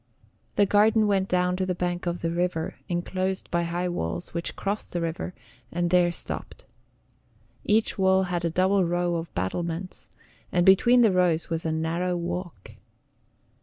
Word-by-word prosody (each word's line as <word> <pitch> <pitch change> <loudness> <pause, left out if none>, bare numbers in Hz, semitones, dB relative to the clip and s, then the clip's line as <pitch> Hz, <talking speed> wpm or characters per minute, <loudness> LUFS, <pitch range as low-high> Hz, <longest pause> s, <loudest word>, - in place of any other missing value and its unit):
The 205 - +4
garden 215 +2 +4
went 195 -2 +1
down 180 0 +1
to 190 - 0
the 180 - -1
bank 175 0 -2
of 175 0 -2
the 165 - 0
river, 170 -1 -1 0.2
inclosed 185 +2 -2
by 170 0 +1
high 175 +1 -2
walls, 85 - -4
which 170 0 -3
crossed 205 +1 -3
the 175 - -1
river, 165 +2 -4 0.4
and 175 0 -1
there 180 -1 +4
stopped. - - -5 1.0
Each 215 -1 +2
wall 190 0 +4
had 175 -2 -2
a 170 - +1
double 185 +3 +2
row 175 0 0
of 165 0 -6
battlements, 170 - -4 0.4
and 175 -1 +2
between 240 +6 +6
the 225 -4 +5
rows 175 -3 +1
was 165 0 -1
a - - 0
narrow 170 +3 -1
walk. 175 - -5
175 Hz, 165 wpm, -26 LUFS, 170-190 Hz, 1.0 s, between